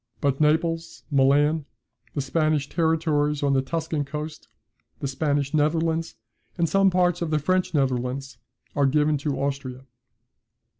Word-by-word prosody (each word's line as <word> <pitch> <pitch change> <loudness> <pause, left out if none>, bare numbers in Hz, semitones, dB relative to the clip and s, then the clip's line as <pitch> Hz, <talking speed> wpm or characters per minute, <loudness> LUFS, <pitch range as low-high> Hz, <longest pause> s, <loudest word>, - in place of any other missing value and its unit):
But 140 0 0
Naples, 165 +2 +1
Milan, 145 +3 +3 0.5
the 145 - 0
Spanish 155 0 0
territories 155 -3 +1
on 140 -1 +2
the 135 - +3
Tuscan 160 +1 -2
coast, 150 +2 -6 0.5
the 140 - -2
Spanish 140 +1 -1
Netherlands, 160 +2 +1 0.4
and 170 -1 +2
some 195 +3 +4
parts 180 -2 +1
of 170 - -1
the 155 - +2
French 185 +3 0
Netherlands, 130 -1 -1 0.4
are 140 -1 +3
given 150 +1 +2
to 140 -1 -2
Austria. 135 -2 -3
150 Hz, 135 wpm, -25 LUFS, 140-160 Hz, 0.5 s, some